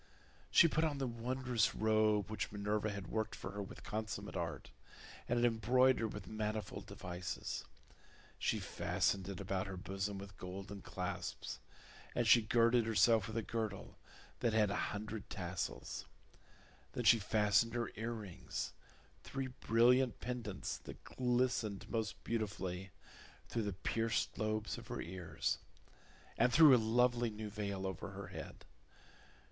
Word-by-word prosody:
She 170 - +7
put 160 0 +1
on 155 -3 +1
the 135 - -1
wondrous 120 -1 0
robe 110 -1 +3
which 105 -3 -2
Minerva 105 +1 0
had 100 -2 -5
worked 110 +5 -2
for - - -6
her 100 +1 -4
with 100 - -8
consummate 105 -1 -4
art, 85 -8 -4 0.6
and 120 - +2
had 120 - +4
embroidered 120 0 +4
with 105 -2 -7
manifold 105 -1 -3
devices; 90 0 -4 0.7
she - - +1
fastened 95 -1 0
it 95 - -5
about 95 -1 -1
her 95 -1 -5
bosom 95 +2 -3
with 100 0 -9
golden 95 +2 -6
clasps, - - -4 0.6
and 120 - +2
she 115 +2 +8
girded 115 +1 +4
herself 110 -1 +4
with 110 0 -4
a 115 - 0
girdle 110 -4 -4 0.4
that 115 - +1
had 105 -2 +4
a - - 0
hundred 105 0 -5
tassels: 90 -1 -4 0.9
then 120 - -2
she 115 0 +7
fastened 105 +2 +3
her 120 -2 -1
earrings, 110 -5 -4 0.5
three 135 -1 -3
brilliant 120 +2 +4
pendants 120 -5 -4
that - - -10
glistened 120 -5 0
most 110 -2 -2
beautifully, 100 -4 -2 0.6
through 115 - 0
the 105 -2 -2
pierced 115 +5 0
lobes 110 -1 -1
of - - -12
her - - -4
ears, 85 -8 -2 0.8
and 120 +2 +5
threw 150 -1 +9
a 120 - +3
lovely 120 +1 +3
new 105 -1 -6
veil 100 -2 -3
over 95 -1 -4
her 95 -1 -7
head. 95 - -8
110 Hz, 140 wpm, -37 LUFS, 100-115 Hz, 0.9 s, threw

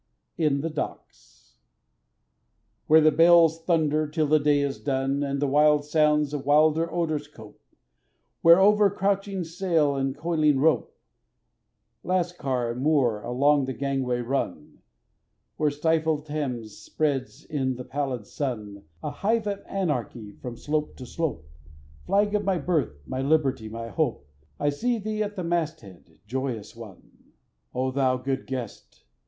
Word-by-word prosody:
In 150 -4 +1
the 165 - -2
Docks 150 - -8 1.3
WHERE 160 +1 +7
the 155 0 +5
bales 165 0 +5
thunder 155 -3 +2
till 155 +1 0
the 155 +1 +4
day 145 -1 +3
is 140 -1 -2
done, 135 0 -1
And 140 -1 -2
the 145 - +1
wild 150 +1 +3
sounds 150 -1 +2
with 140 - -4
wilder 155 +3 +3
odors 155 -4 -1
cope; 110 -8 -15 0.8
Where 170 +2 +7
over 205 +1 +5
crouching 195 -1 -1
sail 165 -4 0
and 135 0 -2
coiling 155 -3 +2
rope, 160 +3 +1 1.1
Lascar 165 -10 -1
and 120 +2 -5
Moor 135 -8 +2
along 140 +4 +2
the 130 - -4
gangway 135 -2 -1
run; 120 - -4 0.8
Where 150 - +2
stifled 155 0 0
Thames 125 -8 -4
spreads 140 -1 -2
in 135 -4 -2
the 125 0 -8
pallid 135 -6 -3
sun, 105 -8 -5 0.2
A 150 - -3
hive 220 +8 0
of 200 -1 -3
anarchy 125 - -3
from 120 +3 -8
slope 150 +4 -2
to 130 - -9
slope; 140 - -4 0.6
Flag 205 +1 +2
of 210 -1 +1
my 195 -2 +1
birth, 150 - -1
my 130 0 -4
liberty, 135 -6 +1
my 115 +1 -6
hope, 80 -7 -2 0.3
I 145 - +1
see 235 +11 -1
thee 215 0 -3
at 205 -1 -3
the 185 - -4
masthead, 155 - -4
joyous 120 -3 -4
one! 115 -4 -14 0.4
O 130 +1 0
thou 130 -1 +1
good 130 +1 -3
guest! 125 -5 -7
145 Hz, 145 wpm, -26 LUFS, 130-165 Hz, 1.3 s, WHERE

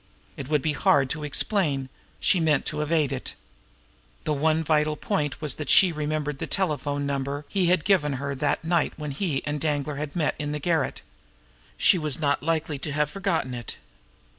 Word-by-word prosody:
It 135 - -7
would 150 -3 +1
be 155 - +1
hard 140 -2 +3
to 150 0 -3
explain 150 -2 0 0.3
she 185 - +3
meant 155 -3 +2
to 150 - -2
evade 150 -2 +1
it. 135 - -4 0.9
The 155 - 0
one 155 +2 +2
vital 150 -1 +2
point 145 -5 -2
was 150 -2 0
that 150 -3 -5
she 185 -2 +7
remembered 150 -2 -2
the - - -3
telephone 145 -6 -1
number 140 +1 -3
he 190 -3 +1
had 180 -3 +2
given 165 -8 +3
her 140 +1 -3
that 140 +3 -1
night 165 -1 +1
when 150 -1 -5
he 145 -1 -2
and 145 -1 -2
Danglar 145 -1 -1
had 145 0 -5
met 160 -4 +1
in 145 0 -2
the 150 - -2
garret. 160 -2 -1 0.7
She 180 - +5
was 150 -3 0
not 145 -2 +1
likely 160 -2 -1
to 150 - -4
have 150 0 0
forgotten 190 -10 -1
it! 120 -1 -6
150 Hz, 190 wpm, -25 LUFS, 145-160 Hz, 0.9 s, she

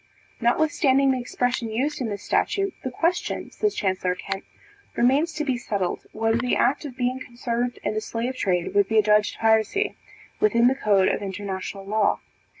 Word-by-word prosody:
Notwithstanding 275 +1 +3
the 260 - 0
expression 245 -1 -1
used 265 +7 -1
in 235 - -1
this 200 -1 -5
statute, 395 -1 0
the 260 - -2
question, 335 +7 -1
says 425 -1 -1
Chancellor 185 -2 0
Kent, 195 +1 -5 0.5
remains 275 +7 +3
to 305 0 -3
be 260 -4 0
settled, 200 -7 -3
whether 225 +1 +1
the 250 0 +1
act 285 - +1
of 260 -3 -8
being 255 +1 0
concerned 240 0 -3
in - - -1
the 215 - -1
slave 235 +4 -3
trade 180 -8 0
would 200 -1 +4
be 220 - +1
adjudged 210 0 +3
piracy, 225 - +2 0.4
within 240 - +4
the 260 - +4
code 205 -7 +3
of - - 0
international 195 0 -5
law. 210 +1 +1
235 Hz, 170 wpm, -24 LUFS, 210-265 Hz, 0.5 s, would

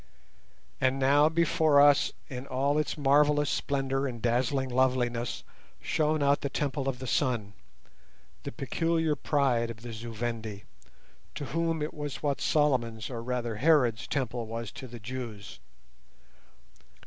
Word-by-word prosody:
And 130 +1 +2
now 140 +3 +4
before 160 -2 +3
us, 145 -1 +5 0.2
in 130 0 -7
all 140 +3 +1
its 155 - -2
marvellous 145 0 +3
splendour 135 0 -1
and 120 -3 -6
dazzling 125 +3 0
loveliness, 125 -2 0 0.4
shone 155 -1 0
out 140 0 +3
the 140 - -2
Temple 135 -1 -1
of 130 - -3
the 130 - -7
Sun—the 105 - -5
peculiar 165 -2 0
pride 130 -7 +1
of 115 0 -9
the 120 -1 -7
Zu 115 +2 -7
Vendi, 110 -2 -4 0.7
to 145 - -4
whom 165 +3 -1
it 150 - -4
was 145 -1 -6
what 145 -2 0
Solomon's, 125 -7 +1
or 115 -2 -4
rather 120 -2 -3
Herod's, 125 -5 +3
Temple 120 -5 -2
was 115 0 -5
to 130 - -9
the 120 -1 -10
Jews. 115 -3 -7
130 Hz, 135 wpm, -29 LUFS, 120-145 Hz, 0.7 s, us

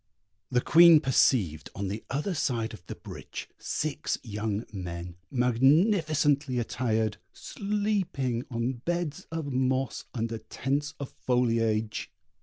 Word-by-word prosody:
The 125 -1 +2
Queen 170 +1 +8
perceived 110 - +2
on 100 0 -3
the 105 +3 -4
other 150 +8 -1
side 120 -8 -1
of 105 - -11
the - - -5
bridge, - - -8
six 155 -2 -2
young 105 0 -3
men, 90 -2 -6
magnificently 145 - +3
attired, 110 -3 0 0.2
sleeping 200 - -1
on 120 +1 -2
beds 175 0 -2
of 160 -4 -3
moss, 130 0 0
under 115 -1 -2
tents 140 +6 -2
of 140 - -5
foliage. 115 -3 0
130 Hz, 115 wpm, -28 LUFS, 110-150 Hz, 0.2 s, Queen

